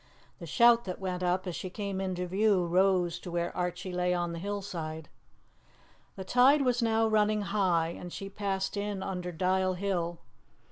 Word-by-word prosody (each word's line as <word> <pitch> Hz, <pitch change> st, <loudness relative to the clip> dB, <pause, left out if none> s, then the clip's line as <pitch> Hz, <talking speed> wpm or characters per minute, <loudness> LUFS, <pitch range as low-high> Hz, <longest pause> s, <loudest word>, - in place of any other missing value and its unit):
The 170 Hz, -, -8 dB
shout 235 Hz, +7 st, +5 dB
that 185 Hz, -2 st, -5 dB
went 185 Hz, -2 st, -3 dB
up 180 Hz, +1 st, 0 dB
as 180 Hz, -3 st, -4 dB
she 185 Hz, -, -5 dB
came 200 Hz, 0 st, -4 dB
into 185 Hz, -1 st, -2 dB
view 190 Hz, 0 st, +2 dB
rose 180 Hz, -1 st, +2 dB
to -, -, -8 dB
where 170 Hz, 0 st, -2 dB
Archie 180 Hz, +1 st, -3 dB
lay 180 Hz, 0 st, +1 dB
on 175 Hz, -1 st, -2 dB
the 170 Hz, -, -5 dB
hillside. 170 Hz, -6 st, -5 dB, 1.1 s
The 190 Hz, -, -6 dB
tide 260 Hz, +7 st, +5 dB
was 250 Hz, -1 st, +1 dB
now 225 Hz, -1 st, +2 dB
running 215 Hz, -1 st, +2 dB
high, 185 Hz, -5 st, +1 dB
and 175 Hz, +1 st, -8 dB
she 195 Hz, -, -6 dB
passed 195 Hz, -1 st, -2 dB
in 205 Hz, -1 st, -3 dB
under 180 Hz, -2 st, -4 dB
Dial 185 Hz, +2 st, +1 dB
Hill. 175 Hz, -3 st, -2 dB
185 Hz, 175 wpm, -30 LUFS, 180-205 Hz, 1.1 s, shout